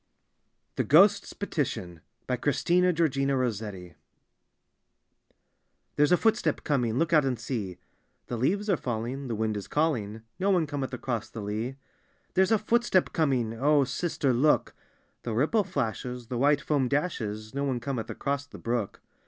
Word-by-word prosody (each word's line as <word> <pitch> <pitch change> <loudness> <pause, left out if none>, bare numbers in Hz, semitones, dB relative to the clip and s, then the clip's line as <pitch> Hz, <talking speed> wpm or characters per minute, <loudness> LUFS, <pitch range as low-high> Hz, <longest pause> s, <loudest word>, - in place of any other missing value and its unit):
THE - - +2
GHOST'S - - +5
PETITION: 85 -3 -3 0.4
Christina 175 +6 +2
georgina 140 -5 +1
ROSSETTI 105 -7 -3 0.6
" - - -48
There's 150 +3 +3
a 180 - +6
footstep 225 +3 +1
coming; 125 -6 0
look 165 +2 +1
out 155 -2 +6
and 130 -3 -1
see." 100 -9 -4 0.2
— - - -45
"The 120 - -4
leaves 190 - 0
are 190 -5 +2
falling, 125 +3 -4
the 115 - -2
wind 110 0 -1
is 100 - -5
calling; 115 -9 -1 0.2
No 195 +2 +1
one 180 -5 +3
cometh 140 -3 -4
across 120 -3 -3
the 110 - -7
lea." 110 +6 -3 0.3
— - - -40
"There's 190 +2 +3
a 220 - +5
footstep 220 -3 +2
coming; 130 -8 +1
O 145 +5 +3
sister, 140 -1 -1
look," 145 +6 +2 0.3
— - - -42
"The 115 -2 -3
ripple 160 - +2
flashes, 125 - -3
the 125 - -2
jvhite 145 +2 +3
foam 140 -4 +1
dashes; 110 -8 -2
No 140 +1 -2
one 130 -3 -1
cometh 120 -2 -4
across 140 0 -2
the - - -11
brook." 115 -3 -3
135 Hz, 160 wpm, -28 LUFS, 115-155 Hz, 0.6 s, a